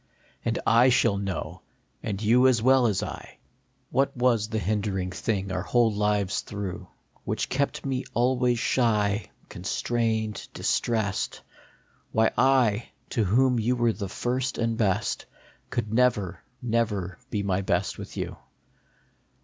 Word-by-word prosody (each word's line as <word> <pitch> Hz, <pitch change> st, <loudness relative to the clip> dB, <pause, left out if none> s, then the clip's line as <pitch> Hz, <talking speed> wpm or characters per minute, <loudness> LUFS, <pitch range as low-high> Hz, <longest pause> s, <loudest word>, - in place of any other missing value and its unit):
And -, -, 0 dB
I 120 Hz, +3 st, +6 dB
shall 115 Hz, -5 st, +3 dB
know, 95 Hz, -4 st, -4 dB, 0.4 s
and 100 Hz, -2 st, -3 dB
you 120 Hz, +4 st, +5 dB
as 125 Hz, -3 st, +4 dB
well 130 Hz, +1 st, +5 dB
as 105 Hz, -4 st, 0 dB
I, -, -, -8 dB, 0.5 s
What 135 Hz, 0 st, +1 dB
was 120 Hz, -4 st, +2 dB
the 110 Hz, -, -2 dB
hindering 100 Hz, -2 st, -1 dB
thing 95 Hz, 0 st, -2 dB
our 90 Hz, -, -1 dB
whole 115 Hz, +3 st, +2 dB
lives 105 Hz, -1 st, +1 dB
through, 100 Hz, -3 st, -6 dB, 0.4 s
Which -, -, -2 dB
kept 140 Hz, +1 st, -1 dB
me 130 Hz, -1 st, -2 dB
always 125 Hz, 0 st, +2 dB
shy, 105 Hz, -4 st, +1 dB, 0.2 s
constrained, 110 Hz, +3 st, -2 dB
distressed; 110 Hz, -5 st, -1 dB, 0.7 s
Why 110 Hz, 0 st, +3 dB
I, 125 Hz, -4 st, +3 dB, 0.2 s
to 115 Hz, -, +1 dB
whom 125 Hz, +5 st, +3 dB
you 120 Hz, +3 st, +1 dB
were 120 Hz, -2 st, +2 dB
the 100 Hz, -3 st, -5 dB
first 130 Hz, +5 st, -2 dB
and 115 Hz, -1 st, 0 dB
best, 105 Hz, -5 st, 0 dB, 0.4 s
Could 105 Hz, +1 st, -2 dB
never, 105 Hz, -8 st, +2 dB, 0.2 s
never 110 Hz, -6 st, -1 dB
be 105 Hz, -4 st, -1 dB
my 95 Hz, -1 st, 0 dB
best 95 Hz, -, -1 dB
with -, -, -8 dB
you; -, -, 0 dB, 0.2 s
HEREAFTER. -, -, -33 dB
110 Hz, 140 wpm, -26 LUFS, 100-125 Hz, 0.7 s, I